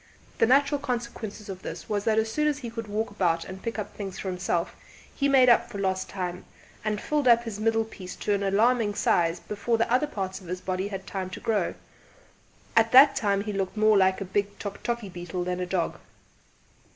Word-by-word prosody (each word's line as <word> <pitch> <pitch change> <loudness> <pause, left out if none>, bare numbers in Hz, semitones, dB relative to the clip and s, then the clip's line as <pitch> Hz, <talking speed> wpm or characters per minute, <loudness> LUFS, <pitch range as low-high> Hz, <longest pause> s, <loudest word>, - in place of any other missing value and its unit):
The - - +5
natural 280 +3 +4
consequence 235 -4 -4
of 190 -2 -7
this - - -7
was 205 -1 -2
that 220 -1 +2
as 220 0 +1
soon 300 +5 +1
as 295 -2 +1
he 240 -5 -7
could 230 -1 -6
walk 215 +1 -2
about 170 -5 0
and 190 0 -8
pick 230 -1 -4
up 210 - -5
things 195 -2 -6
for 190 - -4
himself 180 -2 -1 0.4
he 280 0 +1
made 265 -2 +6
up 240 - +5
for - - -7
lost 190 -1 -1
time, 180 -2 -4 0.4
and 210 -1 -1
filled 295 +1 0
up 235 -1 +6
his 220 -3 -6
middle 225 +1 +2
piece 185 -4 -9
to 205 - -1
an 200 - 0
alarming 210 +2 +2
size 170 -2 +2
before 210 +5 -1
the 230 +1 +1
other 275 +4 +3
parts 190 -7 -4
of 180 - -13
his 180 +1 -4
body 185 +1 -2
had 195 -2 -6
time 190 -2 -4
to - - -7
grow; 220 -2 0 1.0
at 225 0 +4
that 275 +2 +9
time 200 -2 +1
he 210 0 -4
looked 195 +1 -2
more 215 0 +5
like 190 -1 +4
a 195 - -4
big 200 +2 -2
tock 200 -1 -6
tockie 235 -4 -3
beetle 175 +1 -4
than 180 0 -2
a 180 - -2
dog. 175 -2 -1
205 Hz, 220 wpm, -27 LUFS, 190-230 Hz, 1.0 s, that